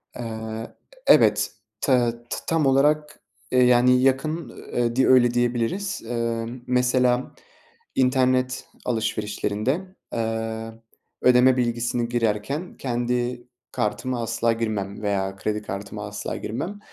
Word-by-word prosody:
Eee, 120 - -5 0.8
e - - +10
evet. - - +3 0.3
Te 125 -4 +3 0.2
t - - -2
tam 165 -2 +2
olarak, 150 +3 +2 0.3
eee, 125 0 +5
yani 125 +1 +5
yakın, 135 +2 +1 0.2
eee, 120 -1 0
di 130 - +3
öyle 120 -2 +5
diyebiliriz. 120 - 0
Emm, 115 +1 -2
mesela 125 0 +2 0.6
internet 130 0 +2 0.2
alışverişlerinde, 115 - -2 0.2
eee, 115 0 -3 0.5
ödeme 125 +1 +6
bilgisini 120 0 0
girerken 120 - -1
kendi 120 0 -2 0.2
kartıma 115 +4 -2
asla 115 +1 +1
girmem 110 -3 -3
veya 95 -2 -1
kredi 105 +1 -2
kartıma 105 +1 -6
asla 105 0 -5
girmem. 180 - -4
120 Hz, 110 wpm, -24 LUFS, 115-130 Hz, 0.8 s, e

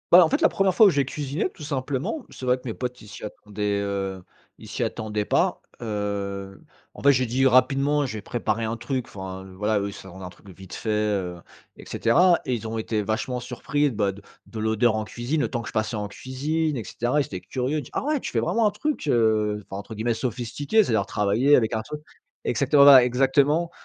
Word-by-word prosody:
Voilà, 180 0 +9
en - - -1
fait, 295 - 0
la 320 - +5
1re 195 -2 +1
fois 220 - +8
où - - +7
j'ai 140 -5 +1
cuisiné, 145 +5 -2
tout 160 - -12
simplement. 145 - -3
C'est 130 - -9
vrai 125 0 +3
que 125 - -18
mes 115 - -3
potes, 125 +1 -5
ils 105 - -13
s'y 105 - -11
attendaient, 105 -1 -3
heu, 100 -2 -3 0.4
ils - - -13
s'y - - -3
attendaient 105 -1 -2
pas. - - +1 0.2
Heu, 100 -3 -4 0.3
en - - -11
fait, 140 0 +6
j'ai 130 0 +1
dit 130 +3 +1
rapidement: 140 +3 +3
«Je 110 -4 -5
vais - - -6
préparer 115 0 -2
un 110 +1 -2
truc», 125 +2 -3
enfin, 95 -1 -8
voilà, 105 +2 +1
eux, 100 - -2
ils 100 - -6
s'attendent 95 -1 -11
à - - -5
un - - -6
truc 90 - -19
de - - -10
vite 95 0 -12
fait, 110 - -5
heu, 105 -4 0 0.4
et - - -12
cetera 170 +9 +3
et 130 - -1
ils 115 -2 -3
ont 115 +1 -4
été 110 -1 -1
vachement 120 +4 -2
surpris, 130 +4 -1
bah, 105 -5 0
de 100 +1 -13 0.3
de 110 - -7
l'odeur 110 +1 +2
en 110 - -2
cuisine, 120 +8 -3
le - - +1
temps 120 - -3
que 110 - -7
je - - -12
passais 110 +1 -1
en 105 -1 -3
cuisine 150 +7 -2
et 115 - -3
cetera. 120 +8 0
Ils - - -2
étaient 95 - -6
curieux, 130 +8 -2
il 150 - -3
dit: - - -13
«Ah - - -1
ouais! 300 +1 0
Tu - - -5
fais - - +2
vraiment 225 -2 +2
un - - +1
truc, 245 - -3
heu, 110 -4 +2
enfin, 95 - -8
entre 110 +3 -9
guillemets, 115 +2 0
sophistiqué, 125 - 0
c'est-à-dire, 110 - +1
travaillé 105 +9 +3
avec 110 -3 +2
un 110 - 0
truc» 150 +6 -7 0.4
exactement 145 -1 +4
voilà, 135 -3 +9
exactement. 140 +6 +2
120 Hz, 240 wpm, -24 LUFS, 105-140 Hz, 0.4 s, Voilà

